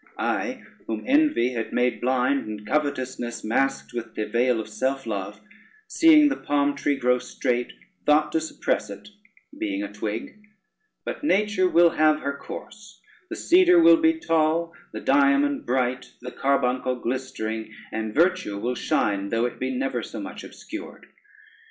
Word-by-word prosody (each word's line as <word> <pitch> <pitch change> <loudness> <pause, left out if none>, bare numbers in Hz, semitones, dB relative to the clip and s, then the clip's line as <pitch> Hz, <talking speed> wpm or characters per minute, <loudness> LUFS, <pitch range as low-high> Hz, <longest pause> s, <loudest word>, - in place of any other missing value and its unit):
I, - - -2 0.2
whom 110 -1 -3
envy 280 - +3
had 115 -2 -4
made 125 0 +1
blind, 130 +1 +1
and 105 -1 -7
covetousness 130 -3 -2
masked 135 +5 -1
with 115 -2 -6
the 110 - -2
veil 120 +2 +1
of 110 - -5
self 135 +4 -2
love, 100 -2 -4 0.5
seeing 320 -6 +6
the 285 - 0
palm 145 0 0
tree 145 - 0
grow 125 -1 +2
straight, 125 0 -2 0.4
thought 150 +1 +4
to 160 - 0
suppress 160 - -2
it - - -10 0.5
being 300 -3 -2
a 295 - -7
twig; 110 - -5 0.7
but - - -5
nature 210 -7 +2
will 170 -1 +5
have 155 -1 +3
her 140 0 -3
course, 210 +7 -10 0.3
the - - -5
cedar 360 0 +5
will 335 0 +7
be 325 0 +3
tall, 165 - +1 0.2
the - - -6
diamond 140 +1 +2
bright, 125 0 -1
the 125 +1 -8
carbuncle 130 -2 0
glistering, 115 -3 -4 0.2
and 110 -1 -4
virtue 170 - +2
will 120 +5 -2
shine 100 -4 0
though 115 +3 +1
it 120 - -5
be 130 - -2
never 130 +1 -2
so - - -7
much - - -7
obscured. - - -9
130 Hz, 155 wpm, -24 LUFS, 120-165 Hz, 0.7 s, will